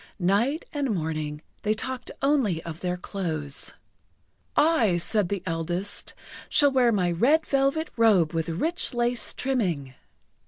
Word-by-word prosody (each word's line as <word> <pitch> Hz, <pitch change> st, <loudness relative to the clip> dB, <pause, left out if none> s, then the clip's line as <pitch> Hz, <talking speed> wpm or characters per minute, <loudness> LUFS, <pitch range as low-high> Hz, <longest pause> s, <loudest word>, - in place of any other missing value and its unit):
Night 205 Hz, -, +1 dB
and 285 Hz, -3 st, -1 dB
morning, 155 Hz, -2 st, -3 dB, 0.2 s
they 215 Hz, +1 st, +1 dB
talked 255 Hz, +3 st, -3 dB
only 265 Hz, -, +2 dB
of 165 Hz, -1 st, -7 dB
their 180 Hz, -1 st, -2 dB
clothes. 160 Hz, -7 st, -3 dB, 0.8 s
"I," 280 Hz, -, +3 dB
said 175 Hz, +2 st, +1 dB
the 200 Hz, -3 st, -3 dB
eldest, 175 Hz, +4 st, -2 dB, 0.3 s
"shall 285 Hz, -1 st, +4 dB
wear 250 Hz, -3 st, +4 dB
my 180 Hz, -5 st, +1 dB
red 275 Hz, -, +3 dB
velvet 275 Hz, +3 st, +1 dB
robe 200 Hz, -8 st, +4 dB
with 165 Hz, 0 st, -1 dB
rich 295 Hz, -, 0 dB
lace 240 Hz, 0 st, +1 dB
trimming." 180 Hz, -, -1 dB
205 Hz, 130 wpm, -26 LUFS, 170-260 Hz, 0.8 s, shall